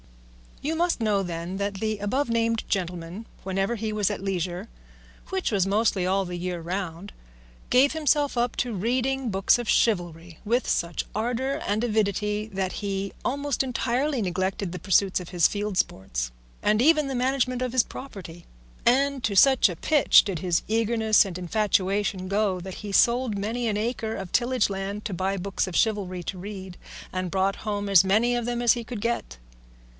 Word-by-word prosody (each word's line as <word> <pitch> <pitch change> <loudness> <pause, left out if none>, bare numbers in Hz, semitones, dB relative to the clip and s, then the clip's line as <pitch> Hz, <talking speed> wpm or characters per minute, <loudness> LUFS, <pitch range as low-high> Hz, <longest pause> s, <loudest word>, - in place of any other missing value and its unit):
You 310 +3 -1
must 345 -2 +1
know, 210 -3 +2
then, 175 0 -4
that 200 0 -2
the 215 +1 -2
above 250 +7 -1
named 230 -1 +1
gentleman 180 +2 -3 0.2
whenever 195 +4 -1
he 220 -1 -3
was 210 -2 +1
at - - -4
leisure 185 0 -2 0.6
(which 380 -6 -1
was 195 -3 +2
mostly 200 -2 +1
all 195 +1 +1
the 180 0 -5
year 180 0 -3
round) 175 +2 -5 0.6
gave 265 +4 +5
himself 295 -3 +1
up 240 0 +1
to 245 -2 -1
reading 250 +5 0
books 195 +4 +3
of 240 - -4
chivalry 175 -6 0
with 240 +4 +1
such 170 -1 -1
ardour 250 +6 -1
and 210 +3 0
avidity 210 -1 0
that 190 -1 -2
he 200 -1 -3
almost 280 +1 0
entirely 260 +1 0
neglected 185 0 -2
the 180 - -6
pursuit 190 +1 +2
of 180 - -8
his 175 -3 +4
field 205 -2 -3
sports, - - -1 0.3
and 210 +1 +3
even 305 +1 +4
the 270 - -3
management 255 0 0
of 250 - -2
his 255 -1 +4
property; 180 -10 -10 0.4
and 270 +2 +3
to 210 -3 0
such 260 +1 +6
a 175 - -4
pitch 295 - +5
did 190 -5 -3
his 175 -1 0
eagerness 220 -1 +3
and 185 -3 -5
infatuation 195 0 0
go 200 -1 +1
that 185 +1 -7
he 205 - -5
sold 235 +1 +3
many 230 +4 -2
an 210 -2 0
acre 225 0 -2
of 190 -2 -6
tillageland 210 -5 0
to 210 - -3
buy 190 +2 -1
books 195 +1 -2
of 180 - -6
chivalry 195 -5 0
to 185 +2 -5
read, 190 -2 -8 0.4
and 185 -1 -2
brought 195 +1 +1
home 205 -1 -1
as 195 -3 +7
many 220 +6 +2
of 240 -1 -1
them 240 0 -2
as 235 - +6
he 240 - -4
could 230 -2 -6
get. 230 - -2
205 Hz, 180 wpm, -26 LUFS, 190-240 Hz, 0.6 s, as